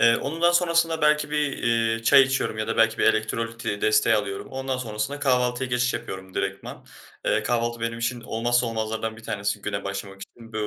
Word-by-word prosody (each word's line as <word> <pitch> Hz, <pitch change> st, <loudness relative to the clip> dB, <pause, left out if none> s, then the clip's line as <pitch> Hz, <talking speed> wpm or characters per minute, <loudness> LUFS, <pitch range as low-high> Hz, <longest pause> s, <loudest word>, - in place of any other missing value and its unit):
Iıı, 115 Hz, 0 st, +5 dB
onun 165 Hz, +4 st, -4 dB
daha 175 Hz, -, +5 dB
sonrasında 170 Hz, -2 st, +2 dB
belki 150 Hz, 0 st, +3 dB
bir, 150 Hz, -2 st, -1 dB
iii, 115 Hz, -1 st, +1 dB
çay 135 Hz, +4 st, +7 dB
içiyorum 135 Hz, -5 st, -1 dB
ya 110 Hz, -, -2 dB
da -, -, -2 dB
belki 115 Hz, 0 st, +3 dB
bir -, -, +2 dB
elektrolit 115 Hz, +1 st, 0 dB, 0.2 s
desteği 420 Hz, 0 st, +4 dB
alıyorum. 405 Hz, 0 st, -3 dB
Ondan 135 Hz, 0 st, -3 dB
sonrasında 115 Hz, +3 st, -4 dB
kahvaltıya 125 Hz, -2 st, +1 dB
geçiş 125 Hz, 0 st, +1 dB
yapıyorum 95 Hz, 0 st, -7 dB
direktman. 95 Hz, 0 st, -4 dB, 0.4 s
Eee, -, -, +2 dB
kahvaltı 120 Hz, -1 st, -1 dB
benim 115 Hz, 0 st, -2 dB
için 120 Hz, +1 st, -2 dB
olmazsa 120 Hz, +1 st, 0 dB
olmazlardan 110 Hz, 0 st, -3 dB
bir 115 Hz, -, -13 dB
tanesi 100 Hz, -1 st, -3 dB
güne 100 Hz, -1 st, -3 dB
başlamak 100 Hz, 0 st, -6 dB
için. 115 Hz, +1 st, -13 dB
Bö 110 Hz, -1 st, -2 dB
115 Hz, 190 wpm, -25 LUFS, 110-135 Hz, 0.4 s, çay